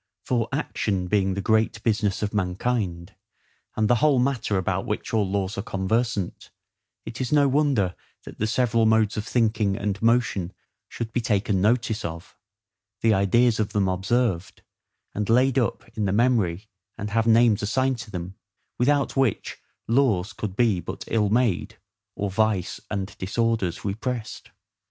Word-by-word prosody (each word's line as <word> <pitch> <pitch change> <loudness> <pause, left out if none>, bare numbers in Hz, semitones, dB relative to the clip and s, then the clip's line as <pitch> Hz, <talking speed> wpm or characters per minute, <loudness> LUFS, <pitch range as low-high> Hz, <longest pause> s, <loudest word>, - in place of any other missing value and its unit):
For 115 -3 0
ACTION 100 -9 -2
being 95 -2 +1
the 100 - -3
great 110 +1 +1
business 105 -3 0
of 105 - -2
mankind, 95 -2 -2 0.6
and 110 -1 +1
the 120 - +4
whole 150 -3 +4
matter 125 -5 0
about 95 +1 -1
which 105 - -4
all 105 -4 +1
laws 100 +1 -2
are - - 0
conversant, 100 +1 -2 0.6
it 115 +3 -6
is 130 - -2
no 145 -2 +4
wonder 135 -10 +2 0.3
that - - -11
the 110 - 0
several 115 -1 +2
modes 110 -1 +3
of 105 - -4
thinking 110 -4 +1
and 100 -2 -3
motion 115 -6 +1 0.4
should 115 -1 -6
be 120 - 0
taken 100 -3 0
notice 110 +1 +1
of, 85 0 -7 0.7
the 115 -1 +4
ideas 110 +4 +3
of 105 - -1
them 100 -2 +2
observed, 95 0 -1 0.5
and 105 +1 -3
laid 130 +3 +4
up 120 0 -2
in 105 - -1
the 95 - 0
memory, 110 -5 +1 0.3
and 105 +1 -5
have 115 +1 +1
names 115 -2 +5
assigned 130 +4 0
to 120 - -8
them; 90 -1 -6 0.5
without 140 +3 +2
which 135 -6 0 0.3
laws 110 -6 +2
could 95 0 -5
be 110 -5 +2
but - - -6
ill 105 -3 +1
made, 110 -2 0 0.4
or 100 -1 -2
vice 105 -2 0
and 100 -1 -4
disorders 100 -2 -1
repressed. 115 +3 -4
110 Hz, 155 wpm, -24 LUFS, 95-120 Hz, 0.7 s, names